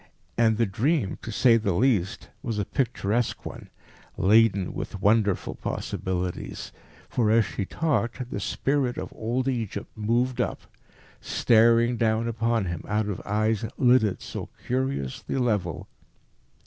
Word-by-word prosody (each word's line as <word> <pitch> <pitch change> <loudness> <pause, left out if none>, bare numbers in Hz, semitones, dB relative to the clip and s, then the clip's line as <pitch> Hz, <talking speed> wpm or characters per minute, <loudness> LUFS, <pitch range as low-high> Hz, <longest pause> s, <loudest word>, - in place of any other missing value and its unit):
And 110 -2 +3
the 115 - +3
dream, 115 - 0
to 115 - -6
say 115 +1 +5
the 100 -5 0
least, 105 -3 +1
was 115 -3 -3
a 105 - 0
picturesque 120 -3 -1
one, - - -8 0.5
laden 100 -2 +4
with 100 - -5
wonderful 105 -1 +2
possibilities. 90 -1 -4 0.4
For 115 -4 +1
as 110 0 +4
she 95 - -4
talked 130 - -1
the - - -3
spirit 135 -3 0
of - - -5
old 120 +4 -1
Egypt 115 -6 -3
moved 120 +4 0
up, - - -2 0.6
staring 115 +1 +3
down 115 0 +1
upon 115 -2 0
him 85 -2 -4
out 105 0 0
of 100 - -4
eyes 110 +1 +1
lidded 120 -6 +3
so - - -6 0.2
curiously 130 - -2
level. 105 - -1
115 Hz, 135 wpm, -26 LUFS, 100-120 Hz, 0.6 s, say